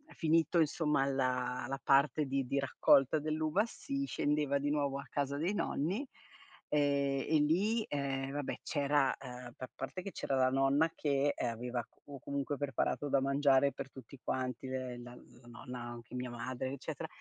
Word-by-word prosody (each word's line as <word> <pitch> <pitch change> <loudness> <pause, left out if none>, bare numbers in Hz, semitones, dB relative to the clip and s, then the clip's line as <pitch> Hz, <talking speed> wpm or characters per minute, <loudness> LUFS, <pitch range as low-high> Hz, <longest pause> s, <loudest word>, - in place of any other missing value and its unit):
finito 165 +1 +3
insomma 150 -3 +2
la 125 -2 0
la 135 +1 -3
parte 140 +2 +4
di 135 0 -1
di 140 +3 0
raccolta 135 +1 +4
dell'uva 155 +6 +1
si 275 +4 -4
scendeva 145 - +1
di 145 +1 -1
nuovo 140 -2 0
a 140 - -7
casa 140 -1 -1
dei 170 +7 0
nonni, 200 - -1 0.6
ehm, 140 -2 +2
e 155 -1 +4
lì, 200 +10 +2
ehm, 135 -1 -2
vabbè 145 -1 -3
c'era 145 -2 +2
ehm, 125 -2 -9
pa 130 - -7
parte 135 +7 -5
che 195 - -6
c'era 135 - -2
la 130 -1 +4
nonna 135 +4 +3
che, 145 -1 +1
ehm, 120 - -1
aveva 120 +1 -3 0.4
comunque 140 0 -2
preparato 145 +1 -1
da 140 - +4
mangiare 140 0 +4
per 135 - -6
tutti 130 +1 -12
quanti. 130 0 -2
Le 130 -1 -4
la 120 0 -9
la 120 0 -17
nonna, 125 +1 -8
anche 120 +1 -8
mia 125 0 -3
madre 125 +2 -4
eccetera, 140 - -5
140 Hz, 165 wpm, -34 LUFS, 130-150 Hz, 0.6 s, parte